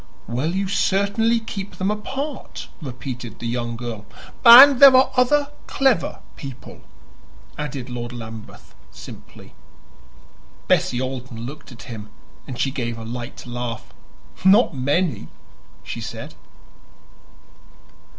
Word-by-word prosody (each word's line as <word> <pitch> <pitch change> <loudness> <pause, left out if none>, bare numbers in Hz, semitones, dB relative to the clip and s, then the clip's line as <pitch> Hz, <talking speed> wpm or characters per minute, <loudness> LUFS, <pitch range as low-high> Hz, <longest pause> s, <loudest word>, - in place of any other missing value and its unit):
"Well, 130 - -2
you 195 0 -1
certainly 200 +4 +1
keep 205 -3 -7
them 190 +2 -1
apart," 270 +7 -6
repeated 125 -4 -7
the - - -8
young 120 0 -3
girl. 115 -3 -7 0.4
"And 255 +3 +10
there 275 -2 +9
are 260 +1 +5
other 285 +3 +3 0.2
clever 265 -10 +1
people," 135 -2 -10 0.7
added 140 -4 -5
Lord 120 -1 -6
Lambeth 110 -2 -10 0.2
simply. - - -13 1.1
Bessie 125 - +2
Alden 130 -3 -5
looked 145 +2 -10
at 120 - -12
him, 110 -4 -9 0.4
and 130 - -7
she 135 - 0
gave 120 -4 -4
a 115 - -8
light 120 +3 -7
laugh. 120 -1 -6 0.5
"Not 190 -1 +5
many," 140 - 0 0.6
she - - -6
said. - - -7
135 Hz, 115 wpm, -22 LUFS, -, 1.1 s, And